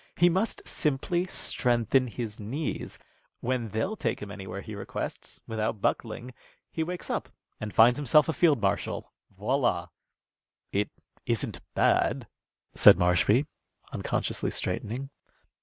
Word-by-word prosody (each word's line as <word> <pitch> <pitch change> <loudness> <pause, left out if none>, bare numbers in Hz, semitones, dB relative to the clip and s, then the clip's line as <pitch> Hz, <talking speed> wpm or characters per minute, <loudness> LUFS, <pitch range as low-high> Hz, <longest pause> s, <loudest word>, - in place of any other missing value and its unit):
He 175 +1 +5
must 190 +6 -1
simply 170 +5 0
strengthen 125 - +1
his 115 -2 -5
knees. 130 +9 -4 0.4
When 120 -2 -1
they'll 110 - -1
take 115 - -1
him 105 -1 -7
anywhere 100 -1 -6
he 110 - -8
requests, 100 - -6
without 110 -1 -2
buckling, 120 +4 -2 0.4
he 160 - -2
wakes 175 +2 -3
up - - -2 0.3
and 105 -1 -4
finds 120 +5 +6
himself 145 +1 +5
a 160 - 0
field 155 -7 +4
marshal. 100 -1 -1 0.3
Voilà!" - - +1 0.8
"It 100 +1 0 0.4
isn't - - -1
bad," - - +2 0.5
said - - +8
Marshby, 90 - +3 0.5
unconsciously - - -1
straightening. 130 +6 -3
120 Hz, 125 wpm, -28 LUFS, 105-150 Hz, 0.8 s, said